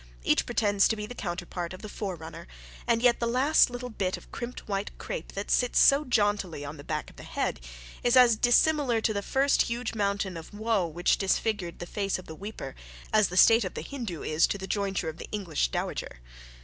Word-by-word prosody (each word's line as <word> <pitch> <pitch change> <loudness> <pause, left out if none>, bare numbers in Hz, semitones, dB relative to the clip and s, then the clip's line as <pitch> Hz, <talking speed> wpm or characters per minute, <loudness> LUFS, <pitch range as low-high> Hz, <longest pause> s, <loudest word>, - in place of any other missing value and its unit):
Each - - +2
pretends 205 -2 +3
to 225 - 0
be 210 -1 -5
the 245 - -8
counterpart 175 -3 -5
of 185 - -11
the - - -5
forerunner, 170 -5 -6 0.4
and 235 0 +2
yet 245 -1 +4
the 235 - 0
last 260 +6 +4
little 245 0 -6
bit 190 -4 -2
of - - -16
crimped 240 +1 -7
white 200 0 -2
crape 155 - -6
that 200 +1 -4
sits 245 -1 +2
so 275 +2 +6
jauntily 205 - 0
on 145 +2 -7
the 145 - -10
back 155 0 -4
of - - -23
the - - -10
head, - - -2 0.4
is 245 +1 +4
as 245 -3 +7
dissimilar 245 +2 +3
to 220 0 0
the 200 - -1
first 270 +6 +2
huge 235 0 -2
mountain 200 -4 -1
of 165 +5 -10
woe 215 -4 +1
which 170 +2 +1
disfigured 195 -2 -1
the 175 - -6
face 200 +1 -2
of 185 - -11
the 160 - -8
weeper, 190 -7 -7 0.4
as 215 -1 +5
the 180 - -5
state 225 +4 +7
of 185 - -5
the - - -4
Hindoo 230 - -6
is 155 +1 +3
to - - -2
the 190 - -6
jointure 195 -3 -1
of 160 0 -5
the - - -8
English 180 - -1
dowager. - - -4
205 Hz, 215 wpm, -28 LUFS, 175-235 Hz, 0.4 s, as